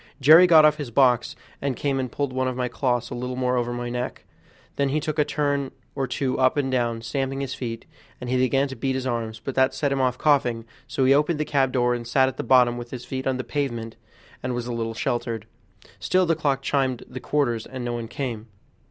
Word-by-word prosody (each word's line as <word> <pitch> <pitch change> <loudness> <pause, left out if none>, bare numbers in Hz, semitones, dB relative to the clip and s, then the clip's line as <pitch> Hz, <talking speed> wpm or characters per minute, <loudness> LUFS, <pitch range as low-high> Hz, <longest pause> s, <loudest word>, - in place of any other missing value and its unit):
Jerry 160 +6 +8
got 160 -3 +7
off 150 0 +4
his 145 -5 -5
box 125 0 +3 0.3
and 135 -2 -1
came 140 0 -1
and 130 -2 -3
pulled 140 0 -2
one 130 0 0
of 130 - -2
my 125 0 -1
cloths 120 0 -1
a - - -3
little 125 +1 -4
more 125 0 0
over 120 -1 0
my 120 0 -4
neck; 125 +1 -4 0.5
then 140 -1 +1
he 150 +3 +1
took 155 +1 -3
a - - +6
turn 145 -2 -1 0.2
or 135 -2 -2
two 130 +1 -2
up 130 +2 +3
and 135 -2 0
down, 120 -3 0
stamping 135 +2 -2
his 135 -2 -3
feet; 115 -2 -5 0.3
then 125 - -7
he 125 - 0
began 135 +2 +2
to 135 - -6
beat 130 +2 -1
his 130 -1 -3
arms, 115 -3 -3
but 130 +4 -5
that 130 0 +2
set 145 -2 0
him 135 -1 +1
off 125 -1 +1
coughing; 125 -7 +2 0.2
so 130 - 0
he 135 - +6
opened 150 +2 +2
the 155 - 0
cab 135 -3 +1
door 125 -1 +2
and 120 -1 -4
sat 130 +2 +3
at 130 - -4
the - - -3
bottom 125 -2 +4
with 120 0 -8
his 125 -1 -7
feet 130 0 -4
on 130 -1 0
the 130 - -3
pavement, 120 -7 -3 0.5
and 125 0 -2
was 120 -1 -3
a 120 - -4
little 115 -1 -3
sheltered. 115 -2 -2 0.5
Still 185 0 +2
the 165 -1 +2
clock 140 -4 0
chimed 130 -3 0
the - - -7
quarters, 120 -7 -1
and 130 -2 -6
no 120 - -2
one 120 -1 -4
came. 120 -3 -5
130 Hz, 245 wpm, -24 LUFS, 120-140 Hz, 0.5 s, Jerry